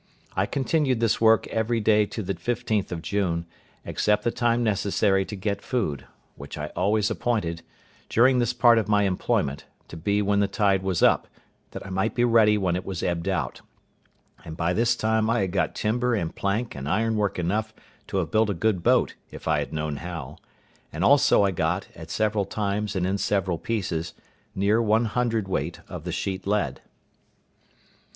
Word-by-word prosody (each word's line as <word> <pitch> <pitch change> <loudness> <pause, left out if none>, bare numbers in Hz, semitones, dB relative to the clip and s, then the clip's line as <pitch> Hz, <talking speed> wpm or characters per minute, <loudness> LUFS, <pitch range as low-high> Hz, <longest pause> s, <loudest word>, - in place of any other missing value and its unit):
I - - +1
continued 135 -2 0
this 115 -1 +1
work 110 -1 +5
every 115 +1 0
day 105 -1 +3
to 110 - -5
the 100 - -2
15th 115 -4 -2
of 85 -2 -5
June, 90 -5 -1 0.4
except 105 0 +1
the 120 - +1
time 120 0 +1
necessary 100 -2 +1
to 105 - -7
get 100 +1 -2
food, 95 - -2 0.3
which 70 +2 -9
I 75 0 -5
always 105 +3 +1
appointed, 105 -8 -1 0.5
during 125 +2 +4
this 120 -1 +1
part 120 -1 +5
of 110 - -2
my 105 -1 +3
employment, 80 -6 -1 0.2
to - - -9
be 100 +5 0
when 100 0 +2
the 100 - +3
tide 100 -2 +1
was 95 -3 -1
up, - - +4 0.4
that - - -8
I 95 - -8
might 95 +4 -1
be 120 - +2
ready 110 -3 +5
when 90 -4 0
it 90 - -3
was 95 -4 -5
ebbed 85 +1 -1
out; 80 -11 -2 0.8
and 80 0 -8
by 85 +2 0
this 120 +4 +2
time 110 -1 +1
I 115 -1 +2
had 95 -2 -1
got 95 - 0
timber 120 +3 0
and 85 -6 -3
plank 105 +5 -1
and 65 +1 -5
ironwork 105 0 0
enough 105 +6 -1 0.4
to - - -3
have 85 -4 -1
built 110 0 +3
a 100 - -1
good 100 0 0
boat, - - +3 0.2
if - - -10
I 75 -2 +2
had 70 -1 -4
known 75 -2 -3
how; 80 -5 -7 0.5
and 80 +4 -3
also 140 -4 +5
I 100 - +2
got, 85 +2 -1
at 80 -1 -10
several 105 +1 0
times 105 0 -2
and 90 -1 0
in 95 +2 -1
several 95 -5 0
pieces, 85 -7 -3 0.4
near 100 +4 +2
one 110 +1 +2
hundredweight 110 -3 -1
of - - -8
the - - -3
sheet 95 0 -3
lead. 105 +1 0
100 Hz, 185 wpm, -25 LUFS, 90-110 Hz, 0.8 s, work